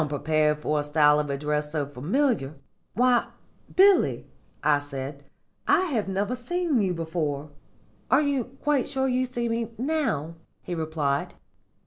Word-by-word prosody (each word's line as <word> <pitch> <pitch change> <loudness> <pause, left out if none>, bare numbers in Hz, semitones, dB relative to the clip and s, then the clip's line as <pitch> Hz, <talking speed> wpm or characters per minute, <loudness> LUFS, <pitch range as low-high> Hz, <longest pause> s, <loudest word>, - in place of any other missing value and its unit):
"Unprepared 150 0 +1
for 150 0 -1
a - - -1
style 150 0 +4
of 150 -1 -2
address 150 +1 -2
so 150 -2 -1
familiar, 155 - 0 0.4
'Why, 245 +1 +3 0.5
Billy,' 390 0 +5 0.4
I 150 -1 +4
said, 140 0 -7 0.4
'I - - +5
have 220 -7 0
never 200 +5 -1
seen 315 0 0
you 185 -3 0
before.' 155 -3 -3 0.6
"'Are 275 +3 +4
you 280 -4 0
quite 270 +1 -1
sure 265 -1 0
you 255 0 +1
see 240 -1 -2
me 230 0 -1
now?' 245 - -1 0.3
he 180 - -5
replied. 155 -4 -1
165 Hz, 140 wpm, -26 LUFS, -, 0.6 s, Billy